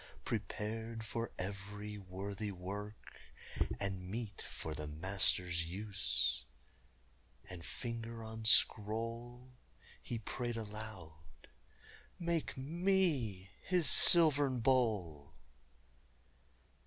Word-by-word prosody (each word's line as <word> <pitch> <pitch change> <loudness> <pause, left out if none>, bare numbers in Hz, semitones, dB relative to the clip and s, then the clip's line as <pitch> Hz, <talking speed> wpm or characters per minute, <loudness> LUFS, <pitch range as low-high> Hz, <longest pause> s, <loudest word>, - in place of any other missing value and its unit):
Prepared 115 +1 -3
for 115 +2 -3
every 105 +2 -5
worthy 100 +2 -4
work, 100 +3 -7 0.6
and 95 -2 -3
meet 110 -1 -4
For 80 - -5
the 75 -1 -5
Master's 85 +1 +1
use!" 75 - -1 1.0
And 90 -2 -8
finger 115 +2 -5
on 110 0 -7
scroll, 115 +4 +2 0.5
He 120 - -4
prayed 120 +2 -3
aloud: 90 - -9 0.7
"Make 170 -4 -1
me 145 - +1
his 180 -4 +2
silvern 145 -6 +7
bowl!" 105 - +1
105 Hz, 80 wpm, -36 LUFS, 95-120 Hz, 1.0 s, silvern